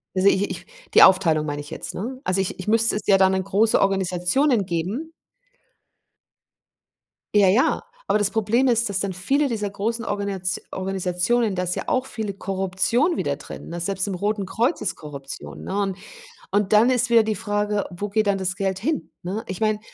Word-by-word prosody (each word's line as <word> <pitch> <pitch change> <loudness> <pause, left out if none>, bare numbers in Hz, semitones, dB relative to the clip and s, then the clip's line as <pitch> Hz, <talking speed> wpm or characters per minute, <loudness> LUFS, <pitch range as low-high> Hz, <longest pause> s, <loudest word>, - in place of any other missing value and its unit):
Also, 185 +1 +3
ich 200 +1 +1
ich - - -6 0.3
die - - +7
Aufteilung 170 -5 +5
meine 145 -1 -3
ich 145 - -12
jetzt, - - -6
ne? 255 +7 -5
Also, 185 +1 0
ich 190 -1 -2
ich 185 - -7
müsste 225 +1 +3
es 210 - -2
ja 195 - +6
dann 190 0 +4
an 190 0 0
große 205 +4 +2
Organisationen 195 +6 +1
geben. 190 - -3 2.2
Ja, 205 -2 +6
ja, 235 - +2 0.2
aber 210 - +2
das 205 -1 +2
Problem 225 +4 +1
ist, 235 -2 +2
dass 200 -1 0
dann 200 -1 -1
viele 270 +12 +1
dieser 220 -5 -2
großen 230 +4 -3
Organisat 195 -3 -2
Organisationen 190 +4 0
da 180 - -1
ist 180 0 -1
ja - - -4
auch 260 0 +1
viele 220 -5 -4
Korruption 195 - 0
wieder 140 -1 -1
drin, - - -10
ne? 170 +1 -5
Selbst 190 +3 -1
im 200 - -2
Roten 205 +2 -1
Kreuz 240 - 0
ist - - -2
Korruption, 140 -3 -8
ne? 190 - -4
Und 195 -2 -2 0.5
und 205 +1 +1
dann 220 +4 +6
ist 250 -1 +1
wieder 230 -1 +7
die 215 0 -1
Frage, 205 0 -1
wo 200 +4 -5
geht 215 +2 +1
dann 200 -1 +1
das 185 -1 -1
Geld 190 -1 -2
hin, 215 - -2
ne? 195 +5 -4
Ich 190 +1 -6
meine, 215 -1 +1
200 Hz, 195 wpm, -23 LUFS, 185-220 Hz, 2.2 s, die